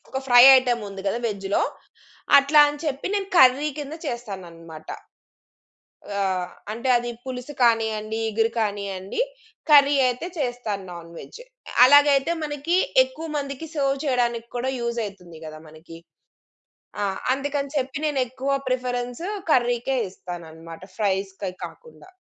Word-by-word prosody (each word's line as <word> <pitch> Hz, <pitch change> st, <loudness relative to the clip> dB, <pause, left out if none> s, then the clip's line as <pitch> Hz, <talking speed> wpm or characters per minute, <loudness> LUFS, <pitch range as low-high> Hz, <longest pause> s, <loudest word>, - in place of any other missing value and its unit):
ఒక 265 Hz, -, -2 dB
fry 245 Hz, -1 st, +8 dB
item 245 Hz, -3 st, +1 dB
ఉంది 195 Hz, -1 st, -8 dB
కదా 215 Hz, -, 0 dB
వెజ్‌లో. 200 Hz, -2 st, -1 dB, 0.8 s
అట్లా 290 Hz, +2 st, +5 dB
అని 290 Hz, 0 st, -6 dB
చెప్పి 280 Hz, -2 st, -3 dB
నేను 395 Hz, -1 st, -1 dB
కర్రీ 265 Hz, +1 st, +6 dB
కింద 295 Hz, +1 st, -6 dB
చేస్తాననమాట. 175 Hz, -, -8 dB, 1.3 s
ఆ! -, -, 0 dB, 0.5 s
అంటే 235 Hz, +4 st, -4 dB
అది 240 Hz, 0 st, -4 dB
పులుసు 255 Hz, +2 st, -7 dB
కానియ్యండి, 220 Hz, -1 st, +1 dB
ఇగురు 225 Hz, +1 st, +1 dB
కానియ్యండి. 200 Hz, -, -3 dB, 0.5 s
కర్రీ 285 Hz, -1 st, +7 dB
అయితే 250 Hz, +7 st, -2 dB
చేస్తాను 245 Hz, -7 st, -3 dB
నాన్‌వెజ్. 170 Hz, -, -11 dB, 0.4 s
అలాగైతే 285 Hz, +2 st, +5 dB
మనకి 295 Hz, +4 st, -1 dB, 0.3 s
ఎక్కువ 295 Hz, +5 st, -9 dB
మందికి 280 Hz, +2 st, -5 dB
సెర్వ్ 275 Hz, -2 st, 0 dB
చేయడానికి 240 Hz, -3 st, 0 dB
కూడా 260 Hz, +2 st, -1 dB
యూజ్ 235 Hz, 0 st, -3 dB
అయితుంది 180 Hz, -5 st, -10 dB
కదా 155 Hz, 0 st, -9 dB
మనకి. 165 Hz, +1 st, -13 dB, 1.0 s
ఆ! -, -, +1 dB, 0.3 s
అందుకని 280 Hz, 0 st, -3 dB
చెప్పి 270 Hz, 0 st, -2 dB
నేనెక్కువ 265 Hz, -1 st, -2 dB, 0.2 s
ప్రిఫరెన్స్ 245 Hz, +3 st, -3 dB, 0.3 s
కర్రీ‌కే 245 Hz, +1 st, +1 dB
ఇస్తానన్నమాట. 165 Hz, -2 st, -10 dB
ఫ్రైస్‌కే 195 Hz, -1 st, -2 dB
కాకుండా. 470 Hz, -6 st, -13 dB
245 Hz, 120 wpm, -23 LUFS, 200-275 Hz, 1.3 s, fry